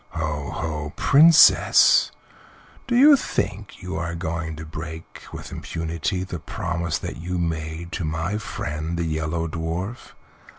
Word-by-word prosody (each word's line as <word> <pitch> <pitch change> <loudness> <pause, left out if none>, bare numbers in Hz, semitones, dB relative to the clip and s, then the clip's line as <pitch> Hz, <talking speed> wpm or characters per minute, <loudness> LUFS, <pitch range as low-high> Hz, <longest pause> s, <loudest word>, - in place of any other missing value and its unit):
Ho, 75 -3 -3
ho, 75 -2 -4
Princess! 160 +3 +6 0.8
Do 240 - 0
you 285 +4 +8
think 105 - -4
you 90 -3 -4
are 85 +1 -3
going 80 -1 -4
to 80 +1 -8
break 80 +1 -8
with - - -8
impunity 85 +3 -3
the 90 -2 -6
promise 85 -1 -3
that - - -6
you 90 +2 -4
made 80 0 -3
to 90 - -4
my 80 +6 -2
friend 80 -5 -4
the 85 - -1
Yellow 80 +1 -2
Dwarf? 85 +8 -5
85 Hz, 135 wpm, -23 LUFS, 80-90 Hz, 0.8 s, you